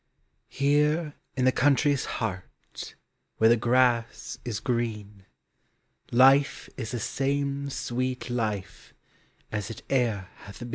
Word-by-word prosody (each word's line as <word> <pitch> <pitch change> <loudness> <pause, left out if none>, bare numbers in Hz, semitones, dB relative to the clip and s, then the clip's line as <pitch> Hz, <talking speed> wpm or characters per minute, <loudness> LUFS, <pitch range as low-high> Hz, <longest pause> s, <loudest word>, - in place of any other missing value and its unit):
Here 150 +2 +2 0.2
in 130 - +2
the 130 - +6
country's 140 +1 +2
heart 95 -5 -6 0.4
Where 110 +1 +5
the - - +7
grass 120 0 +1
is 115 -4 -3
green, 105 -5 -3 0.8
Life 135 +3 +5
is 115 -4 -5
the 120 - -3
same 140 +3 -1
sweet 130 -1 -3
life 110 -6 -4 0.6
As 105 -1 -3
it 115 - -8
e'er 115 -8 +1
hath 100 - -12
been. 120 0 -7
125 Hz, 115 wpm, -27 LUFS, 110-140 Hz, 0.8 s, the